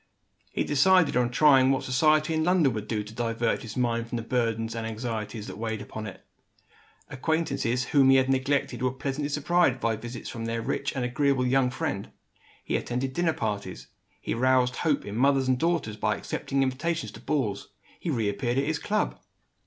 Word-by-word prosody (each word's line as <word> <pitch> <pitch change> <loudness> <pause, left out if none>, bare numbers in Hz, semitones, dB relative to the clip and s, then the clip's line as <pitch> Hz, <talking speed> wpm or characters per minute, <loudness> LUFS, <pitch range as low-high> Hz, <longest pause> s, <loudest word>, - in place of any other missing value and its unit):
He - - 0
decided 165 +2 +4
on 125 -1 +2
trying 135 0 +5
what 135 0 +1
society 155 +4 +3
in 160 0 +1
London 170 -7 +3
would 105 -1 -5
do 105 -2 -1
to 105 +1 -11
divert 115 0 -1
his 115 - -8
mind 115 -2 0
from - - -4
the 115 - -2
burdens 115 -2 -1
and 115 -1 -4
anxieties 110 -1 -4
that 105 - -8
weighed 110 -1 -4
on 110 0 -5
it. 95 - -11 0.8
Acquaintances 135 -4 -1
whom 135 +1 +4
he 135 - +7
had 130 0 +4
neglected 135 +1 0
were 130 - +2
pleasantly 135 +2 -3
surprised 150 -2 +2
by 115 -2 0
visits 115 +2 -7
from 115 -1 -5
their 115 0 -2
rich 140 - -2
and 130 -2 -1
agreeable 135 +1 +1
young 130 0 +3
friend. 130 -7 -3 0.5
He - - 0
attended 130 +2 -3
dinner 170 0 +1
parties; 100 -6 -4 0.3
he - - -3
roused 125 +1 +2
hope 155 -4 0
in 100 - -6
mothers 135 +2 +3
and 130 -1 +2
daughters 165 -10 0
by 105 0 +1
accepting 135 +5 -1
invitations 160 +6 -2
to - - -11
balls; 130 -9 -2 0.3
he 175 - -4
reappeared 120 -1 -1
at 135 - +2
his 155 0 -1
club. 210 +1 -1
130 Hz, 185 wpm, -27 LUFS, 115-145 Hz, 0.8 s, he